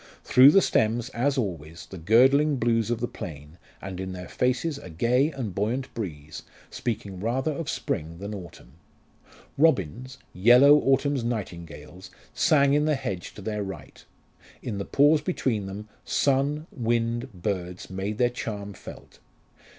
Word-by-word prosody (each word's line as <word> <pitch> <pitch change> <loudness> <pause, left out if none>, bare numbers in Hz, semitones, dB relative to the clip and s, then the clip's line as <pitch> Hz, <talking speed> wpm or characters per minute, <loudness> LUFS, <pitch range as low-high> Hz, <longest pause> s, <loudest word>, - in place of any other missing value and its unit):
Through 130 +2 +7
the 195 +5 +5
stems, 115 +2 +1
as 135 +4 0
always, 85 - -4
the 95 - -10
girdling 135 - +4
blues 115 -2 +1
of 120 -1 -2
the 120 - 0
plain, 80 -7 -9 0.2
and 95 -1 -6
in 95 0 -5
their 90 0 -8
faces 135 +4 -1
a 90 - -11
gay 120 - +2
and 125 - -5
buoyant 115 +8 -2
breeze, 75 -8 -6 0.3
speaking 100 -5 -4
rather 125 +8 -1
of 155 +1 -5
spring 80 +2 -3
than 100 +3 -6
autumn. 85 -10 -10 0.9
Robins, 125 - +1 0.2
"yellow 125 +9 +6
autumn's 135 -1 +1
nightingales," 90 -7 -6 0.2
sang 140 +1 +3
in 150 +1 +3
the 155 -1 +2
hedge 100 -10 -5
to 105 - -10
their 105 0 -3
right. 95 -1 -8 0.6
In 105 -5 -4
the 100 - -3
pause 145 +2 +4
between 125 - -2
them, 100 +3 -7 0.2
sun, 140 +2 0
wind, 120 +1 -1
birds 90 -2 -5
made 95 +3 -4
their 120 0 +2
charm 105 -4 -5
felt. - - -13
115 Hz, 150 wpm, -26 LUFS, 95-135 Hz, 0.9 s, Through